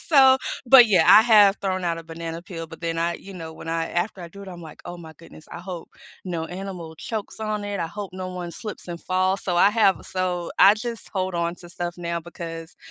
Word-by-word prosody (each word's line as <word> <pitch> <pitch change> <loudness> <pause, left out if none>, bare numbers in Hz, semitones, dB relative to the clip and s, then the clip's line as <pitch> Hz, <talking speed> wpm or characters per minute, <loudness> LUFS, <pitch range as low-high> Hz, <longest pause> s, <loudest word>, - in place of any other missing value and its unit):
so 265 -4 +6 0.3
But, 245 -1 +9
yeah, 185 -7 +4
I 215 - +10
have 210 -3 +6
thrown 185 -2 -1
out 170 -1 -1
a - - -7
banana 165 0 -6
peel, 165 -3 -7
but 165 0 -12
then 165 -1 -2
I, 170 +1 0
you 195 0 -11
know 165 -3 -7
when 160 - -10
I 165 0 -1
after 180 +2 -2
I 170 - -7
do 200 +3 -12
it, 195 - -9
I'm 175 -2 -9
like, 155 -2 -11
"Oh 175 - -7
my 160 -2 -11
goodness, 165 0 -15
I - - -7
hope 175 -1 -7 0.4
no 170 -3 -3
animal 180 -3 -7
chokes 220 +4 -6
on 215 -1 -2
it. 205 -1 -3
I 165 - -1
hope 200 +3 -7
no 185 0 -5
one 180 -1 -5
slips 210 +1 -8
and 170 -1 -6
falls," 185 +1 0
so 175 -2 0
I 200 +3 +6
have 210 -4 +3
so 180 -2 -2
I 200 - +8
just 230 +1 -6
hold 185 -2 -2
on 170 0 -1
to 175 - -13
stuff 175 0 -5
now 170 -1 -3
because 165 -1 -8
180 Hz, 240 wpm, -24 LUFS, 170-200 Hz, 0.4 s, I